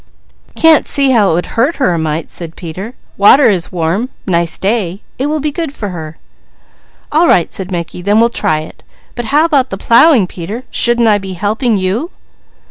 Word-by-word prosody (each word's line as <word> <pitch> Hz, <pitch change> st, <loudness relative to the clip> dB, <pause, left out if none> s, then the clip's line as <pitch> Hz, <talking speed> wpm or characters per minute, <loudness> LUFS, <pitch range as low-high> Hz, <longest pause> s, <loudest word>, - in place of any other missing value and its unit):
"Can't 325 Hz, -2 st, +4 dB
see 275 Hz, -2 st, +1 dB
how 215 Hz, -6 st, +3 dB
it -, -, +1 dB
would 175 Hz, -, -1 dB
hurt 265 Hz, +8 st, 0 dB
her 220 Hz, -11 st, +1 dB
a 170 Hz, -, -1 dB
mite," 160 Hz, 0 st, -3 dB
said 165 Hz, -2 st, -7 dB
Peter. 185 Hz, +8 st, -8 dB, 0.2 s
"Water 220 Hz, +5 st, +6 dB
is 180 Hz, -4 st, -2 dB
warm, 180 Hz, +8 st, -1 dB, 0.2 s
nice 170 Hz, -3 st, +1 dB
day. 200 Hz, -2 st, -2 dB, 0.2 s
It 270 Hz, -, 0 dB
will 305 Hz, +1 st, -1 dB
be 300 Hz, +1 st, -2 dB
good 325 Hz, -1 st, -4 dB
for 205 Hz, -, -5 dB
her." 160 Hz, -3 st, -8 dB, 0.9 s
"All 325 Hz, +3 st, +3 dB
right," 170 Hz, -, +2 dB
said 190 Hz, -1 st, -3 dB
Mickey, 175 Hz, -1 st, -5 dB
"then 205 Hz, +4 st, +2 dB
we'll 230 Hz, +1 st, +4 dB
try 155 Hz, -9 st, -1 dB
it. 155 Hz, -, -13 dB, 0.3 s
But 240 Hz, -, -5 dB
how 295 Hz, +7 st, +3 dB
about 280 Hz, -6 st, +1 dB
the 195 Hz, -, -5 dB
plowing 235 Hz, -, +4 dB
Peter, 190 Hz, +7 st, -7 dB
shouldn't 240 Hz, -1 st, +2 dB
I 210 Hz, -1 st, +3 dB
be 190 Hz, -1 st, -7 dB
helping 210 Hz, +5 st, -1 dB
you?" 195 Hz, -, -2 dB
205 Hz, 195 wpm, -13 LUFS, 175-260 Hz, 0.9 s, Water